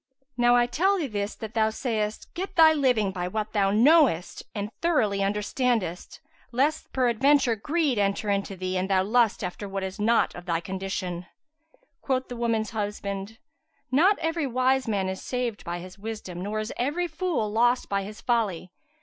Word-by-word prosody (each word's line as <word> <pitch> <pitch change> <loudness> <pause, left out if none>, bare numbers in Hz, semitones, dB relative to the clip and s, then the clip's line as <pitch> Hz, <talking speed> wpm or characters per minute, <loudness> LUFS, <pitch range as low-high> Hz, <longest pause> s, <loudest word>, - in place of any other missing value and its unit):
"Now 240 0 +4
I 240 0 +4
tell 365 +11 +2
thee 335 - -1
this 205 -4 -3
that 220 0 -8
thou 220 -1 +2
sayst 220 -2 -3
get 380 +2 -5
thy 320 -2 +7
living 250 -9 +2
by 180 -1 -3
what 215 +3 -3
way - - -32
thou 200 -2 +2
knowest 235 - +4
and 205 0 -3
thoroughly 220 -13 +2
understandest, 210 -2 -1 0.3
lest 275 +6 0
peradventure 260 +1 +3
greed 290 +1 0
enter 200 +1 0
into 200 0 -1
thee 185 0 -2
and 190 +1 -2
thou 190 -1 +3
lust 225 +1 +2
after 190 +3 -5
what 195 0 -3
is 190 +2 -5
not 225 +3 +2
of 175 +1 -10
thy 165 -1 +1
condition." 185 -1 -4 0.7
Quoth 260 -1 -1
the 245 - -5
woman's 230 -3 -1
husband, 205 -1 -4 0.5
"Not 360 +10 +4
every 325 -2 -1
wise 255 +1 +1
man 200 -3 0
is 190 0 -4
saved 245 -4 -3
by 175 +1 -4
his 185 +3 -10
wisdom, 205 -5 -6
nor 205 +3 -3
is 215 +1 -4
every 295 +8 0
fool 320 - -2
lost 240 +3 +2
by 200 0 0
his 210 +2 -8
folly. 205 -8 -1
220 Hz, 175 wpm, -26 LUFS, 195-255 Hz, 0.7 s, thy